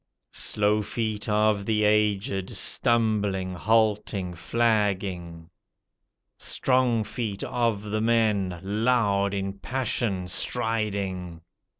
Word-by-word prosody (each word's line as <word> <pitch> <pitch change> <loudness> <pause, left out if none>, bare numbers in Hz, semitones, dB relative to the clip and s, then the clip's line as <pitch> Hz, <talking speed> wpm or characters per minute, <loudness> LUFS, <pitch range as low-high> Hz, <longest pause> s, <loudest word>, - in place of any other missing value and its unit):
Slow 105 +1 +1
feet 110 0 -3
of 105 -1 +2
the 105 -1 +2
aged, 105 -2 +1
stumbling, 105 -5 +1
halting, 105 -1 +1
flagging. 95 -4 -1 0.9
Strong 125 -3 +2
feet 105 -2 -4
of 115 -4 0
the 105 +1 -2
men 105 -6 +1
loud 100 -1 +1
in 95 0 -4
passion 115 -6 -2
striding. 100 -7 -2
105 Hz, 85 wpm, -26 LUFS, 95-110 Hz, 0.9 s, of